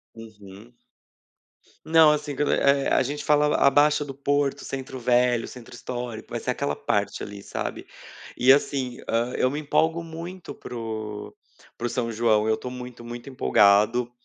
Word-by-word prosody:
Uhum. 110 0 -13 1.1
Não, 160 -1 +6
assim, 150 -1 -2
q - - -3
eh, 140 0 +3
a - - +4
gente 145 +3 -4
falava 150 0 +3
a 140 - +5
Baixa 145 +1 +3
do 145 - -7
Porto, 140 0 0
centro 130 -1 -6
velho, 120 -1 +2
centro 120 -1 -11
histórico, 120 -2 -6
vai 120 - -3
ser 125 - -5
aquela 140 +3 -1
parte, 100 0 -1
ali, 100 -1 -8
sabe. - - -5 0.5
E 130 +2 +5
assim, 135 -3 +1
hã, 120 +2 0
eu 130 - +1
me 145 - -3
empolgo 160 +3 +1
muito 170 +3 -8
para 125 - -9
o 110 -2 -5 0.5
para 120 - -4
o - - 0
São 115 -1 -2
João, 110 -1 +2
eu 110 - +3
estou 125 - -7
muito, 125 -1 -9
muito 120 +2 -8
empolgado. 105 - +3
125 Hz, 170 wpm, -25 LUFS, 115-145 Hz, 1.1 s, Não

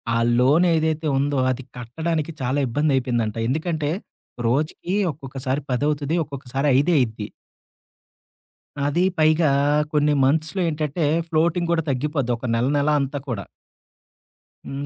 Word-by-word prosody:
ఆ - - +2 0.2
లోన్ 145 +8 +4
ఏదైతే 160 0 0
ఉందో, 140 0 0
అది 130 +1 -4
కట్టడానికి 160 +6 -3
చాలా 130 +3 0
ఇబ్బంది 145 +5 0
అయిపోయిందంట. 120 -4 -1
ఎందుకంటే, 155 +2 -1 0.6
రోజుకి 150 +8 -1 0.2
ఒక్కొక్కసారి 135 0 -4
పదవుతది. 145 +4 0
ఒక్కొక్కసారి 140 -1 -4
ఐదే 160 +6 +3
అయిద్ది. 110 -4 -2 1.6
అది 160 +5 +1
పైగా 155 0 +4 0.4
కొన్ని 150 0 +3
మంత్స్‌లో 155 +7 +1
ఏంటంటే 155 0 -2 0.2
ఫ్లోటింగ్ 170 +1 +1
కూడా 165 -1 +1
తగ్గిపోద్ది. 140 -1 -1
ఒక 125 - -8
నెల 120 +3 +1
నెల 145 +1 +1
అంతా 140 +1 -3
కూడా. 110 -7 -4 1.2
హ్మ్. 140 +1 -5
145 Hz, 120 wpm, -22 LUFS, 130-155 Hz, 1.6 s, లోన్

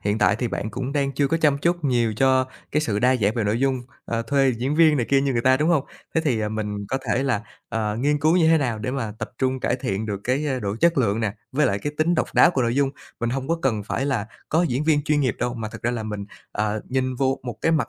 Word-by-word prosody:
hiện 105 +2 0
tại - - +3
thì 120 - -2
bạn 110 +1 -3
cũng 130 +5 -4
đang 140 -2 0
chưa 140 +1 +1
có 165 - +2
chăm 150 -3 +2
chút 170 +2 0
nhiều 120 -5 +2
cho 130 +1 +3 0.3
cái 150 - +2
sự 105 -8 -1
đa 125 +2 +3
dạng 105 -2 +1
về 115 -3 0
nội 110 +4 0
dung, 135 -2 +1 0.2
ờ, 115 0 -2
thuê 135 +2 +2
diễn 125 +5 -2
viên 155 -2 +5
này 120 -4 0
kia 135 -1 +4
như 140 0 0
người 115 -1 0
ta, 130 0 +5
đúng 155 +3 +1
hông? 155 -5 +3 0.3
Thế 160 - +3
thì, 120 -7 +1
à, 105 - -1
mình 105 -2 -4
có 130 +3 -1
thể 120 +3 +1
là, 130 -6 0 0.3
ờ, 110 -2 -2
nghiên 145 +5 +1
cứu 155 +4 +3
như 165 - +4
thế 165 - +5
nào 125 -6 -1
để 110 +4 -3
mà 125 -6 -3
tập - - -5
trung 130 -1 0
cải 125 - 0
thiện 110 -4 -3
được 100 -2 -3
cái, 135 +5 0
a, 135 -3 -1
độ 100 -3 -3
chất 170 -2 +4
lượng 110 -3 +1
nè, 110 -3 0 0.2
với 150 +3 +3
lại 100 - 0
cái 145 +7 -4
tính 170 +3 +3
độc - - +1
đáo 175 - +7
của 135 -7 0
nội 120 +1 0
dung. 140 -1 +2 0.3
Mình 120 0 0
hông 135 +2 -3
có 165 - +1
cần 110 -6 +1
phải 135 +6 -2
là 120 -7 -1 0.2
có 165 +3 +2
diễn 140 -3 0
viên 150 -2 +3
chuyên 150 0 +1
nghiệp 130 -5 +1
đâu 120 0 -1
mà 110 -2 -4
thật - - -9
ra 120 - +1
là 120 -2 -3
mình, 105 -2 -4 0.3
ờ, 105 0 -1
nhìn 130 0 0
vô 135 +1 0
một 120 -3 -5
cái 160 - +2
mặt 155 - +1
130 Hz, 295 wpm, -23 LUFS, 110-145 Hz, 0.3 s, đáo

